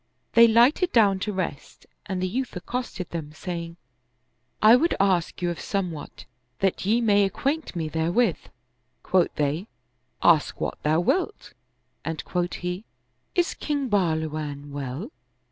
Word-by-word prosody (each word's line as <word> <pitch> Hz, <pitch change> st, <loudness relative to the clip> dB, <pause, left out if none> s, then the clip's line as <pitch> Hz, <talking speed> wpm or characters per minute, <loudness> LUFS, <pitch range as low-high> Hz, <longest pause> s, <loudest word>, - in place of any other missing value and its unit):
They 235 Hz, 0 st, +8 dB
lighted 245 Hz, -, +4 dB
down 200 Hz, -5 st, +4 dB
to 210 Hz, -, -2 dB
rest 185 Hz, -7 st, -5 dB, 0.2 s
and 185 Hz, -1 st, -2 dB
the -, -, +1 dB
youth 250 Hz, +6 st, -3 dB
accosted 195 Hz, -1 st, -4 dB
them 155 Hz, -3 st, -5 dB
saying, 170 Hz, 0 st, -6 dB, 0.4 s
" 130 Hz, -, -47 dB, 0.3 s
I 220 Hz, +2 st, +9 dB
would 330 Hz, +7 st, +2 dB
ask 180 Hz, -2 st, +1 dB
you 175 Hz, -, +1 dB
of 170 Hz, -, -6 dB
somewhat 180 Hz, -7 st, -4 dB, 0.3 s
that 195 Hz, 0 st, 0 dB
ye 230 Hz, +3 st, +3 dB
may 205 Hz, -3 st, +4 dB
acquaint 270 Hz, -, -1 dB
me 165 Hz, -2 st, -2 dB
therewith." 165 Hz, +4 st, +1 dB, 0.6 s
Quoth 185 Hz, -2 st, +2 dB
they, 150 Hz, +7 st, -1 dB, 0.3 s
" 125 Hz, +1 st, -20 dB
Ask 160 Hz, -4 st, +4 dB
what -, -, -3 dB
thou 155 Hz, +3 st, +2 dB
wilt"; 375 Hz, -, -1 dB, 0.5 s
and 160 Hz, -1 st, -4 dB
quoth 175 Hz, -1 st, -1 dB
he, 180 Hz, +3 st, -4 dB, 0.5 s
"Is 350 Hz, -2 st, +2 dB
King 285 Hz, -3 st, -2 dB
Bahluwan 155 Hz, -6 st, -1 dB
well?" 140 Hz, -, -5 dB
180 Hz, 145 wpm, -25 LUFS, 160-225 Hz, 0.6 s, I